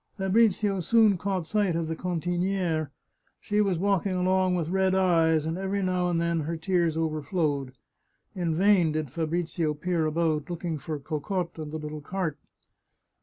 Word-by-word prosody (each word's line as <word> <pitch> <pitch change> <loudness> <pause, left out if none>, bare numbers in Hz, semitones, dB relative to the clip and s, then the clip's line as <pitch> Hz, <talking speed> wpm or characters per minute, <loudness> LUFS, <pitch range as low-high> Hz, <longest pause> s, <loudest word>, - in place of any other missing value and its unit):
Fabrizio 200 0 +2
soon 220 +2 +4
caught 185 -1 -2
sight 200 -1 +1
of 165 -1 -1
the 160 - -2
cantiniere; 175 -2 -1 0.5
she 210 0 0
was 195 -4 +1
walk 195 +1 +1
ing 185 - -1
along 185 0 +2
with 165 -3 -2
red 190 0 +2
eyes, 165 -4 +3
and 165 +3 -2
every 195 +1 -1
now 180 -1 +1
and 170 -1 +1
then 170 0 0
her 160 +2 -3
tears 170 -1 +1
overflowed. 155 -3 -1 0.6
In 170 -4 -1
vain 185 -3 +4
did 155 -4 -3
Fabrizio 165 0 -1
peer 165 0 0
about, 155 0 0
looking 170 -2 -3
for 150 +3 -4
Cocotte 165 +5 -3
and 155 -1 -6
the 155 - -3
little 150 0 -6
cart. 160 -2 -3
170 Hz, 165 wpm, -27 LUFS, 160-190 Hz, 0.6 s, soon